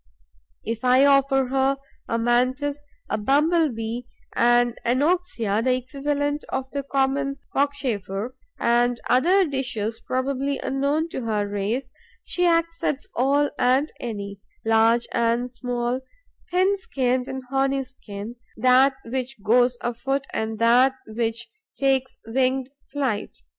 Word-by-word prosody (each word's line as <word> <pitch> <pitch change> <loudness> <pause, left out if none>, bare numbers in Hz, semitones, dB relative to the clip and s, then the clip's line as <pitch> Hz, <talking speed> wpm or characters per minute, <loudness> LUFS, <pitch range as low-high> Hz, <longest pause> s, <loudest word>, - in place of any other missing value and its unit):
If 230 +1 -4
I 255 +2 +5
offer 275 -1 +4
her 270 +1 +2 0.3
a 230 - 0
Mantis, 260 +5 0 0.2
a - - -1
Bumble 305 +8 +3
bee, 230 +1 -5 0.3
an 240 0 +4
Anoxia 250 - +1
the 255 0 +3
equivalent 285 +3 -2
of 265 0 -3
the 280 - -2
common 275 0 0 0.2
Cockchafer 250 -6 -1 0.2
and 240 0 +2
other 360 +10 +4
dishes 235 -6 -2
probably 270 +2 -1
unknown 280 +4 0
to 265 - -4
her 210 -2 0
race, 210 +6 -2 0.3
she 355 0 0
accepts 335 -4 0
all 280 +4 +2
and 260 +5 +3
any, 200 -4 -5 0.3
large 225 +1 +4
and 235 +1 +1
small, 245 0 -2 0.5
thin 380 +3 +2
skinned 255 -7 -1
and 265 0 -5
horny 270 0 +1
skinned, 230 -3 -9 0.2
that 255 +3 +5
which 255 -2 -4
goes 245 +3 +3
afoot 265 +3 -2
and 220 0 -2
that 245 +4 +4
which 230 +1 -3 0.3
takes 265 -1 +1
winged 260 +2 0 0.2
flight. 265 -7 -2
255 Hz, 120 wpm, -24 LUFS, 235-275 Hz, 0.5 s, I